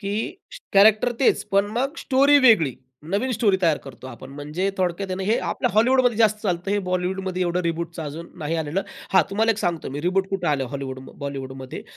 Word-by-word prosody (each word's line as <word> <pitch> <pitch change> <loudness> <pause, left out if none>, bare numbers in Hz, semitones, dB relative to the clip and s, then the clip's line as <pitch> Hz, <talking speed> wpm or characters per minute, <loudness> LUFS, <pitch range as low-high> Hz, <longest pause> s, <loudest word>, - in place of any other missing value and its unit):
की 200 -1 -3 0.6
कॅरेक्टर 215 +4 +5
तेच 265 - +3
पण 200 +1 +3
मग 265 +6 -1
स्टोरी 280 0 +4
वेगळी, 215 - +5 0.4
नवीन 215 +7 0
स्टोरी 210 -5 +2
तयार 165 -3 +4
करतो 135 -1 -12
आपण 130 +1 -10
म्हणजे 150 +7 -3
थोडक्यात 185 +1 -1
आहे - - -1
ना, 190 - -4
हे 215 +4 +2
आपल्या 245 - -1
हॉलिवूडमध्ये 245 +2 +3
जास्त 215 -2 +3
चालतं. 180 -1 -1
हे 205 - +2
बॉलिवूडमध्ये 185 0 -1
एवढं 175 +1 0
रिबूटचं 170 0 -3
अजून 155 +3 -7
नाही 160 +2 -2
आलेलं. 160 +4 -2 0.3
हां, 190 - +6
तुम्हाला 220 +3 +2
एक 220 - -1
सांगतो 170 -8 -2
मी 140 +2 -5
रिबूट 185 +3 0
कुठं 195 -3 -2
आलं 140 -3 +1
हॉलिवूड 135 -2 -5 0.2
बॉलिवूडमध्ये. 135 0 -6
185 Hz, 190 wpm, -23 LUFS, 155-215 Hz, 0.6 s, हां